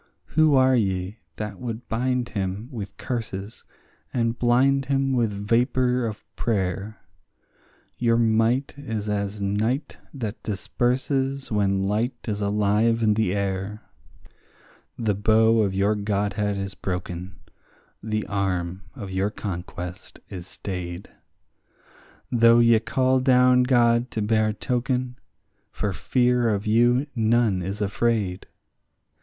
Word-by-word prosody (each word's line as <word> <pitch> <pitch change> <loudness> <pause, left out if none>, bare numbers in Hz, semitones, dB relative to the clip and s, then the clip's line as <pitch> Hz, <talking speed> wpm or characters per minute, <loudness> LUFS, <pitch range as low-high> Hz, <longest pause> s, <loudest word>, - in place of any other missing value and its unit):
Who 155 -1 +5
are 130 0 +5
ye 95 -2 -1 0.2
that 105 -2 -6
would 120 -1 -6
bind 125 +1 -1
him 100 +3 -3
with 100 -5 -7
curses 110 -4 -5 0.5
and 115 -2 0
blind 130 +3 +3
him 135 -1 +1
with 120 -4 +1
vapour 120 +4 +1
of 110 -1 -7
prayer? 100 -1 -2 1.0
Your 115 -1 +3
might 115 +3 +2
is 110 -7 -4
as 100 0 -2
night 110 +8 -1
that 115 -6 -5
disperses 130 +6 -1
when 100 -2 +1
light 110 +6 0
is 105 -2 -2
alive 105 +3 +2
in 105 -1 +4
the 105 -3 0
air. 100 +1 -3 1.1
The 110 -3 0
bow 110 +3 +4
of 100 -2 0
your 100 +2 +2
godhead 105 0 -1
is 95 0 -4
broken, 90 0 -5 0.6
the 110 -1 -2
arm 95 -2 -2
of 100 -2 -7
your 95 +2 0
conquest 90 -3 -7
is 90 -2 -7
stayed; 90 -1 -6 1.2
Though 115 -1 +6
ye 115 -1 +5
call 130 +2 +1
down 125 -1 +5
God 120 -1 +3
to 110 - -2
bear 110 0 +2
token, 125 +2 -2 0.5
for 105 -2 -2
fear 125 +2 +2
of 105 -1 -1
you 120 +5 +3
none 115 -4 +2
is 100 +4 -4
afraid. 105 -2 0
110 Hz, 120 wpm, -24 LUFS, 100-120 Hz, 1.2 s, Though